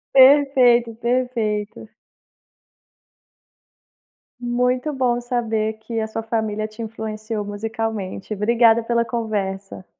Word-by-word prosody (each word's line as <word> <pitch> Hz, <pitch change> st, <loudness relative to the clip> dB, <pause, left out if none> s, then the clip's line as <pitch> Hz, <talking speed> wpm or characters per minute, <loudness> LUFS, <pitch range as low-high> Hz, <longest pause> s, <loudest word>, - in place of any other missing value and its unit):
Perfeito, 260 Hz, -4 st, +6 dB
perfeito. 230 Hz, -4 st, -2 dB, 2.5 s
Muito 250 Hz, +4 st, 0 dB
bom 245 Hz, -2 st, +1 dB
saber 225 Hz, -3 st, -1 dB
que 225 Hz, +1 st, -6 dB
a 220 Hz, -, -2 dB
sua 225 Hz, +1 st, -4 dB
família 220 Hz, -1 st, -2 dB
te 215 Hz, +2 st, -11 dB
influenciou 215 Hz, -1 st, -5 dB
musicalmente. 215 Hz, -1 st, -4 dB
Obrigada 230 Hz, +2 st, +3 dB
pela 235 Hz, 0 st, +1 dB
conversa. 200 Hz, -5 st, -4 dB
225 Hz, 90 wpm, -21 LUFS, 215-240 Hz, 2.5 s, Perfeito